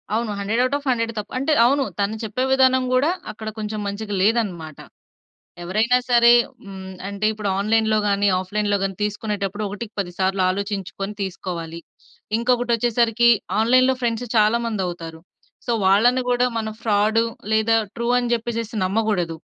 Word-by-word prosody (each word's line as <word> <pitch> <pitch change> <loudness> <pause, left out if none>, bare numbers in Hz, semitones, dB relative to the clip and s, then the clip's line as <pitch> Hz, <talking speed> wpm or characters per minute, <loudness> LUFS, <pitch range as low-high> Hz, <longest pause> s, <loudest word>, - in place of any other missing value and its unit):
అవును. 225 -1 -1
100 210 +4 0
out 270 +2 0
of 290 - -12
100 230 -2 0
తప్పు. 210 - -5
అంటే 275 +4 +1
అవును. 275 +3 +3 0.2
తను 200 +2 0
చెప్పే 220 +4 -2
విధానం 260 -1 +4
కూడా 265 +5 +3 0.2
అక్కడ 215 +1 -7
కొంచెం 215 0 -4
మంచిగా 205 +1 -5
లేదన్నమాట. 190 -8 0 0.8
ఎవరైనా 215 +8 +2
సరే, 235 -1 +6 0.3
హ్మ్. 190 -1 -9 0.2
అంటే 200 +1 -3
ఇప్పుడు 215 -2 -3
ఆన్‌లైన్‌లో 220 +1 +2
గాని, 200 0 +2
ఆఫ్‌లైన్‌లో 205 +2 -1
గాని 195 -1 -2
తీసుకునేటప్పుడు 210 -1 -3
ఒకటికి 205 +2 -7
పది 180 -3 -2
సార్లు 190 0 0
ఆలోచించుకొని 200 +1 -4
తీసుకోవాలి. 175 -3 -5 0.6
ఇంకొకటి 245 0 +1
వచ్చేసరికి 235 0 +2 0.3
ఆన్‌లైన్‌లో 255 +3 +4
ఫ్రెండ్స్ 235 0 -1
చాలా 215 +2 +4
మంది 215 -4 -2
అవుతారు. 165 -2 -7 0.5
సో - - +1
వాళ్ళని 230 +7 +4
కూడా 245 0 +2
మనం 220 -1 -3
ఫ్రాడ్ 215 0 +2 0.3
లేదా 220 +1 +3 0.2
ట్రూ 235 0 -3
అని 245 -1 -2
చెప్పేసేసి 230 -1 -3
నమ్మకూడదు. 190 -5 -1
215 Hz, 150 wpm, -22 LUFS, 200-235 Hz, 0.8 s, సరే